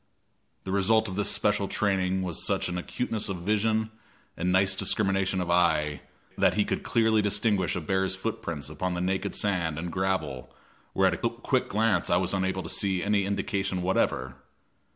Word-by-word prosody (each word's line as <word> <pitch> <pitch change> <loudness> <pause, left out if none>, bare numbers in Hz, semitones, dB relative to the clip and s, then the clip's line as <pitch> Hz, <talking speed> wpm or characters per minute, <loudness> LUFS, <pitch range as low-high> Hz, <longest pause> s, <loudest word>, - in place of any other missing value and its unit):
The 95 - -5
result 100 +3 +3
of 95 - -5
this 105 0 +2
special 105 -1 +1
training 95 -2 0
was 90 -3 -2
such - - 0
an 90 - -4
acuteness 110 +4 -2
of 90 -3 -4
vision 110 +2 +1 0.4
and 90 +2 -1
nice 95 +1 +3
discrimination 95 -1 +1
of 90 -1 -1
eye 80 -5 +2 0.4
that - - +4
he - - +2
could - - -2
clearly 110 -2 +2
distinguish 105 -2 +1
a 90 - -2
bear's 95 +3 0
footprints 95 -8 -4
upon 90 +4 -3
the - - -2
naked 95 +1 -1
sand 85 -7 0
and 85 +2 -4
gravel 80 -10 -2 0.4
where - - +3
at - - -2
a - - +3
quick - - -1
glance 105 -4 +1
I 85 - +4
was 90 0 0
unable 95 -1 -1
to - - -7
see 95 -3 0
any 100 -1 +1
indication 95 -2 -2
whatever. 65 -8 0
95 Hz, 175 wpm, -27 LUFS, 90-100 Hz, 0.4 s, that